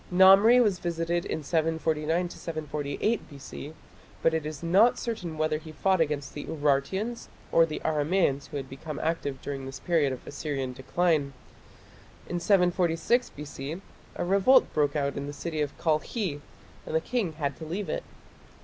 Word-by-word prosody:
Namri 195 +6 +7
was 200 -5 +1
visited 170 0 -1
in 160 - -3
749 160 +2 0
748 155 +6 -3
B.C., 140 +1 -9 0.5
but 165 - +4
it 160 -2 -1
is 155 +1 -7
not 195 +8 +5
certain 180 -9 -4
whether 155 0 0
he 155 0 -10
fought 190 +3 +2
against 145 -3 -1
the 145 - -5
Urartians, 160 +11 -1 0.2
or 165 0 +5
the 155 - -4
Aramaeans 150 -2 +1
who - - -5
had 135 -1 -5
become 140 +3 -7
active 150 -4 -2
during 135 -2 -4
this 135 0 -7
period 160 -6 +2
of 130 - -7
Assyrian 140 -3 -3
decline. 145 +2 0 0.9
In 175 - -2
746 180 +5 +2
B.C. 145 +2 -7 0.4
a - - -2
revolt 200 +8 +4
broke 145 -1 +1
out 140 -1 -1
in 140 0 -4
the 145 - -5
city 155 0 -3
of 145 -1 -3
Kalkhi 160 0 -1 0.5
and - - -3
the - - +5
king 215 -5 -1
had 140 -3 -2
to - - -9
leave 180 +6 -4
it. - - -2
160 Hz, 160 wpm, -28 LUFS, 145-180 Hz, 0.9 s, Namri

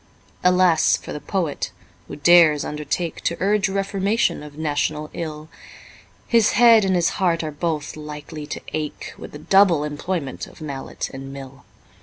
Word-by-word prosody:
Alas 180 -3 +4
for - - -8
the - - -5
Poet, 170 -4 -2 0.4
who - - -7
dares 155 -1 +5
undertake 150 +3 -3
To 170 - -1
urge 200 0 +2
reformation 195 +2 0
of 150 0 -11
national 150 0 -2
ill! 155 -2 -6 0.8
His 230 -2 +3
head 230 -3 +7
and 190 -1 +1
his 175 -1 +2
heart 170 -3 +2
are 155 - -3
both 150 0 -3
likely 150 0 -8
to - - -6
ache 155 -1 -4
With - - -9
the - - -8
double 175 0 +4
employment 150 -1 -4
of - - -16
mallet 140 -4 -6
and 135 0 -8
mill. 135 -1 -10
155 Hz, 155 wpm, -22 LUFS, 150-185 Hz, 0.8 s, head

